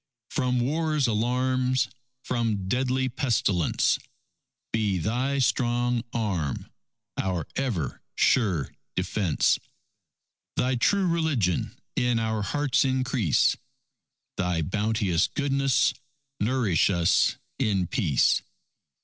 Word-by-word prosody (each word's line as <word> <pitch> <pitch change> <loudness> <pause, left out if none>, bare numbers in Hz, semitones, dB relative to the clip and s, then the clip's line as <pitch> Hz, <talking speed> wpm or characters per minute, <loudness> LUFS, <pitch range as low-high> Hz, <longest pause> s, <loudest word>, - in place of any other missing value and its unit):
From 125 -3 0
war's 155 +2 +1
alarms, 125 +3 +1 0.4
from 110 -6 -1
deadly 130 +3 +1
pestilence, 120 - +1 0.7
Be 105 -4 +1
Thy 125 - -1
strong 120 -2 +1
arm 95 - -2 0.5
our 90 -5 -1
ever 105 - -2
sure 95 - +2 0.2
defence; 90 -2 +1 1.0
Thy 130 +1 +1
true 190 +11 +2
religion 155 - 0 0.2
in 125 -1 +2
our 110 -1 -1
hearts 145 +7 +1
increase, 130 - +2 0.8
Thy 90 -3 0
bounteous 105 -1 +1
goodness 140 -2 +1 0.5
nourish 110 - +2
us 85 -1 +2 0.2
in 95 -4 +1
Peace. 90 - +2
120 Hz, 90 wpm, -26 LUFS, 95-130 Hz, 1.0 s, sure